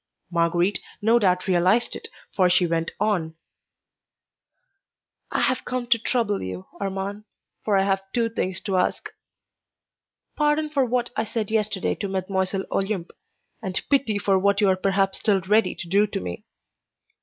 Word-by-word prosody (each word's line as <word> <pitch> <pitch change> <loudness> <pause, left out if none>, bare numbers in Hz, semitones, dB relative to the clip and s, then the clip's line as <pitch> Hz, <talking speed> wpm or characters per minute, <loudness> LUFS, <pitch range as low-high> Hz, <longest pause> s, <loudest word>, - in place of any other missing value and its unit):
Marguerite 175 +3 +1 0.2
no 225 +3 +4
doubt 180 -4 +2
realized 185 +5 +2
it, - - -6 0.3
for 185 -2 +3
she 180 0 +4
went 165 -1 0
on: 175 -7 0 2.0
"I - - 0
have 255 - +1
come 250 -1 -3
to 235 -2 +5
trouble 225 -3 0
you, 95 0 -6
Armand, 200 +1 -4 0.4
for 205 -2 +2
I 195 - +3
have 195 0 +1
two 235 -1 +1
things 190 -5 -2
to 195 -3 -1
ask: 180 - -1 1.2
pardon 300 0 +1
for 275 -3 +2
what 245 0 -1
I - - +1
said 220 -1 -3
yesterday 215 -3 0
to 200 - -4
Mlle. 190 0 -1
Olympe, 195 -3 -1 0.5
and 190 -4 0
pity 265 -7 +3
for 195 -1 +2
what 200 +1 +2
you 205 -2 +4
are 190 - +4
perhaps 195 0 0
still 200 -3 +2
ready 210 +4 +2
to 175 - -7
do 200 +4 +3
to - - -3
me. 90 -1 -6
195 Hz, 155 wpm, -24 LUFS, 185-220 Hz, 2.0 s, to